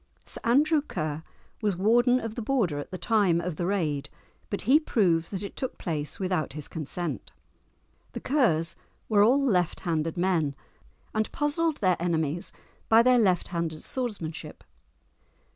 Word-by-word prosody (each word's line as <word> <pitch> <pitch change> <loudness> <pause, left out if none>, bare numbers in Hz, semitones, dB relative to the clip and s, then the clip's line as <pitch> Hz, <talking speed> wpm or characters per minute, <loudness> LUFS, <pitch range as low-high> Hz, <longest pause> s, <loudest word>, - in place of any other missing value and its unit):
Sir - - -3
Andrew 295 +6 +4
Ker 155 - -4 0.4
was 205 -5 0
warden 240 +6 +4
of 225 -2 -5
the 235 - -5
Border 215 - 0
at 145 - -7
the 185 - -5
time 200 -6 +2
of 170 -2 -4
the 175 - -1
raid, 155 -8 -1 0.4
but 200 - -2
he 270 +8 +5
proved 175 - +1
that 195 -1 -4
it 200 - -7
took 260 - -4
place 150 -4 -3
without 180 -7 -1
his 150 -1 -6
consent. 165 +2 -5 0.8
The - - -4
Kers 185 - +1 0.3
were 210 -2 +4
all 245 +7 +5
left 180 -9 +1
handed 165 0 -1
men, 170 -6 +1 0.6
and 215 0 0
puzzled 300 +1 0
their 185 -4 +3
enemies 165 -1 0 0.4
by 225 +1 +7
their 250 0 +5
left 185 -6 +2
handed 165 -3 -3
swordsmanship. 210 -11 -5
185 Hz, 155 wpm, -27 LUFS, 165-235 Hz, 0.8 s, by